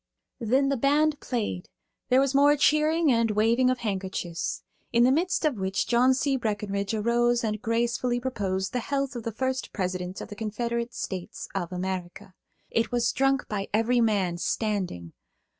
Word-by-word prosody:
Then 260 +4 +2
the 275 - +1
band 295 +4 +2
played; 210 -7 -3 0.4
there 255 +1 +5
was 275 0 +2
more 285 +1 +5
cheering 305 +2 +3
and 230 -1 +2
waving 225 +4 +3
of 255 - +1
handkerchiefs, 190 -3 -3 0.3
in 235 0 +4
the 255 - +5
midst 335 +3 +1
of 275 -9 0
which 190 +1 -1
John 250 +2 +4
C. 275 0 +1
Breckenridge 205 -2 -2
arose 240 +2 +2
and 215 -1 -2
gracefully 240 +1 0
proposed 195 -7 -2
the 250 - 0
health 275 +1 -2
of 240 - -4
the 230 - -4
first 260 +3 -2
President 185 -1 -3
of - - -8
the 205 - -7
Confederate 235 +2 -3
States 185 -2 -5
of 185 -2 -3
America. 185 0 -5 0.4
It 230 - 0
was 240 -1 +1
drunk 270 0 +1
by 200 -2 -3
every 235 +2 +2
man, 195 -6 +1
standing. 185 - -2
230 Hz, 165 wpm, -27 LUFS, 200-260 Hz, 0.4 s, there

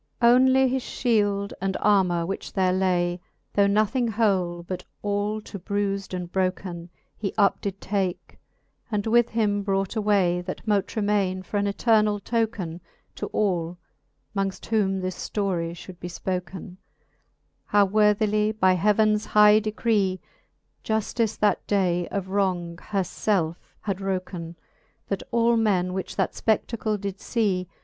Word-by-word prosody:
XLIV. 235 0 +6
Onely 260 +1 +5
his 260 +1 0
Ihield 205 -4 0
and 190 0 -1
armour, 185 -5 +3
which 195 +3 -5
there 185 -1 +2
lay, 180 -1 +1 0.3
Though 200 -1 +4
nothing 215 +5 +2
whole, 190 -6 0
but 180 +1 -5 0.2
all 205 +1 -1
to 200 - -9
brufd 200 0 -2
and 175 -1 -5
broken, 185 -2 -2 0.3
He 200 -3 -4
up 200 -2 +3
did 195 -1 -4
take, 190 -3 -3 0.5
and 205 -2 -1
with 235 +1 +3
him 210 -3 +1
brought 195 0 -1
away, 200 -5 +2
That 185 +5 -7
mote 205 -2 0
remaine 200 -3 0
for 205 - -3
an 205 0 +1
eternall 210 0 +2
token 210 -6 -2 0.3
To - - -5
all, 175 -4 -1 0.6
mongft 195 -1 -2
whom 195 -4 +1
this 185 0 -4
ftorie 180 -5 -1
fhould 175 +1 -11
be 175 - -6
fpoken, 180 +1 -5 0.9
How 205 -1 +4
worthily 210 +1 +2
by 190 -4 +3
heavens 210 +3 +2
high 210 0 +6
decree, 215 -3 0 0.6
Juftice 220 0 -1
that 210 - +1
day 180 -4 +1
of 195 -2 -4
wrong 180 -4 -1
her 195 -2 0
felfe 175 -3 -1 0.2
had 200 -3 -2
wroken. 185 -3 -4 0.5
That 195 - -1
all 235 0 +3
men, 185 -5 +1
which 190 0 -4
that - - 0
fpe£i:acle 220 -1 -1
did 200 -1 -4 0.2
lee. 190 -6 +1
200 Hz, 140 wpm, -25 LUFS, 185-215 Hz, 0.9 s, XLIV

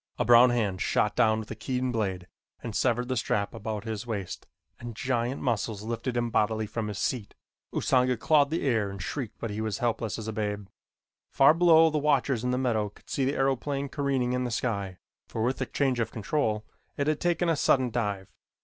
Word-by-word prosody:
A - - 0
brown 120 +2 +7
hand 105 -7 0
shot - - +1
down 110 0 +3
with 110 -1 -6
a - - -4
keen 125 +3 -2
blade 95 -6 -2 0.4
and 115 -3 -5
severed 120 -1 +1
the 130 - -1
strap 105 -3 -1
about 110 -2 -4
his 110 0 -5
waist 100 -5 -5 0.3
and 120 -2 -7
giant 120 +2 -1
muscles 110 -4 -1
lifted 115 +2 -3
him 120 -1 0
bodily 110 0 +1
from 110 +1 -4
his 105 -2 -5
seat. 115 -6 -2 0.4
Usanga 125 -1 +2
clawed 145 +4 +3
the 165 +2 -2
air 110 -6 +1
and 100 0 -8
shrieked 110 - -5
but 115 - -4
he 105 +1 -3
was 110 -2 -2
helpless 115 -2 -1
as 110 -1 -6
a 110 - -3
babe. 105 -1 -3 0.6
Far 135 +2 +6
below 165 -1 +6
the 155 - 0
watchers 140 -4 +1
in 125 - 0
the 125 - +1
meadow 115 -5 0
could 100 - -18
see 135 - 0
the 140 - 0
aeroplane 135 +1 0
careening 135 -3 0
in 125 0 0
the 125 - -2
sky, 100 -6 -2 0.3
for 110 - -3
with 125 +3 0
the 130 - -2
change 135 -4 0
of 115 - 0
control 110 -1 -1 0.3
it 140 - 0
had 155 0 0
taken 175 0 +1
a 165 - +3
sudden 130 -3 +2
dive. 105 -5 -2
120 Hz, 210 wpm, -28 LUFS, 110-130 Hz, 0.6 s, brown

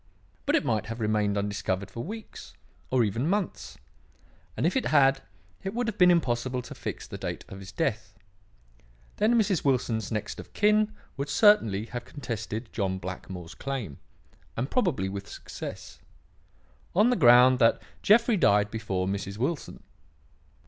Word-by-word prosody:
But - - +3
it - - +1
might 105 -2 0
have 115 +1 -5
remained 105 -2 +1
undiscovered 100 -1 -2
for 115 +4 -5
weeks, 220 +4 -9 0.3
or 130 -2 +3
even 115 - -1
months; 200 -2 -2 0.8
and - - 0
if 175 - +1
it 265 - +1
had, 135 -2 +4 0.4
it 195 +3 -5
would 245 0 -1
have 215 -3 -4
been 180 -1 +7
impossible 130 -6 +1
to - - -9
fix - - -6
the - - -8
date - - -5
of 95 - -9
his 95 0 -10
death. 110 - -2 1.0
Then 220 +3 +3
Mrs. 200 -6 +1
Wilson's 120 -6 0
next 105 -1 -3
of - - -11
kin 210 +1 +3 0.3
would 140 +1 -3
certainly 115 - +4
have 120 +1 -6
contested 115 -3 -6
John 95 -3 -1
Blackmore's 90 -2 -7
claim 120 - -5 0.6
and 130 +4 -2
probably 165 - +1
with 100 +1 -6
success - - -8 1.0
on 215 +6 +5
the - - +3
ground 125 - +7
that 115 -2 +4 0.2
Jeffrey 230 +1 +4
died 105 - +3
before 100 -5 -2
Mrs. 100 0 -3
Wilson. 140 +7 -3
120 Hz, 155 wpm, -27 LUFS, 105-170 Hz, 1.0 s, been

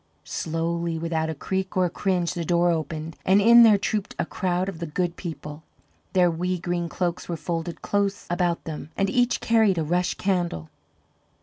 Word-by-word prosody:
Slowly, 165 +1 -2
without 160 -1 -1
a 160 - -3
creak 190 +5 -3
or 185 - +4
a - - 0
cringe, 180 -3 0
the 175 -2 -3
door 175 +1 +2
opened, 160 0 -4
and 190 +2 +4
in 235 +3 +8
there 220 -3 +7
trooped 205 0 -2
a - - 0
crowd 180 0 -1
of 190 -5 -5
the 170 - -4
Good 175 +2 -2
People. 155 -3 -7 0.5
Their 180 -2 +4
wee 180 +2 -1
green 175 0 -2
cloaks 175 +1 -3
were 170 - -2
folded 165 0 -4
close 200 -1 0
about 175 -1 0
them, 155 -1 -6
and 195 0 +1
each 245 +1 +2
carried 220 -5 +3
a 160 - +1
rush 175 +3 0
candle. 175 - -1
175 Hz, 185 wpm, -25 LUFS, 165-190 Hz, 0.5 s, in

